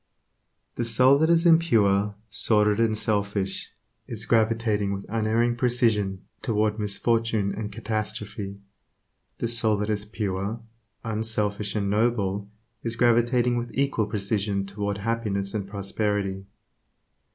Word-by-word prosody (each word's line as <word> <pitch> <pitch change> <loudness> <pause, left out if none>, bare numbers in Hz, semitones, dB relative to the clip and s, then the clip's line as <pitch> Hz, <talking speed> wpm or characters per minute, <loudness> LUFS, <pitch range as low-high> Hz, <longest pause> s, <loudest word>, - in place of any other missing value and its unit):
The 120 - 0
soul 125 +4 +5
that 160 +1 +3
is 170 0 +4
impure, 105 - +4
sordid 105 -1 +2
and 110 -2 +2
selfish, 100 -2 -1 0.4
is - - -5
gravitating 110 -3 +1
with 100 0 -5
unerring 115 +2 +1
precision 115 -6 +1 0.2
toward 110 -2 0
misfortune 110 0 0
and 105 -1 -5
catastrophe; 105 -2 -4 0.8
the - - -1
soul 115 -2 +2
that 105 +1 -1
is 105 -1 -1
pure, 105 0 -3 0.4
unselfish, 105 -2 -2
and 100 -2 0
noble 105 -3 0 0.3
is 115 -1 -3
gravitating 120 +1 +3
with 120 0 -3
equal 135 -6 +1
precision 100 -1 -1
toward 100 +1 -3
happiness 100 -2 -2
and 100 -3 -3
prosperity. 100 -1 -2
110 Hz, 120 wpm, -25 LUFS, 100-115 Hz, 0.8 s, soul